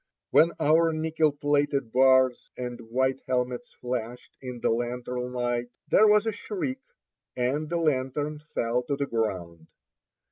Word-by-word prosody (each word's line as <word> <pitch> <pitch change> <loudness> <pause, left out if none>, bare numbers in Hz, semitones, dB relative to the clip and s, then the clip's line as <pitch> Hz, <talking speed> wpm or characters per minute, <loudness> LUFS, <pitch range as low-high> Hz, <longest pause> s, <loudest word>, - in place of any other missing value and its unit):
When 165 +2 +5
our 165 +2 +4
nickel 155 -1 +1
plated 145 -3 0
bars 130 0 +4
and 125 -1 -5
white 130 +2 0
helmets 125 -1 -2
flashed 125 -1 -5
in 125 -2 -7
the - - +1
lantern 125 +1 -3
light, 120 -1 -1 0.2
there 215 - +6
was 210 0 +5
a 225 - +1
shriek, 270 - -4 0.6
and 140 +5 -1
the 170 - 0
lantern 150 -1 -1 0.2
fell 120 +2 +1
to 140 +3 -2
the 140 0 -1
ground. 90 -9 -3
130 Hz, 140 wpm, -27 LUFS, 120-150 Hz, 0.6 s, there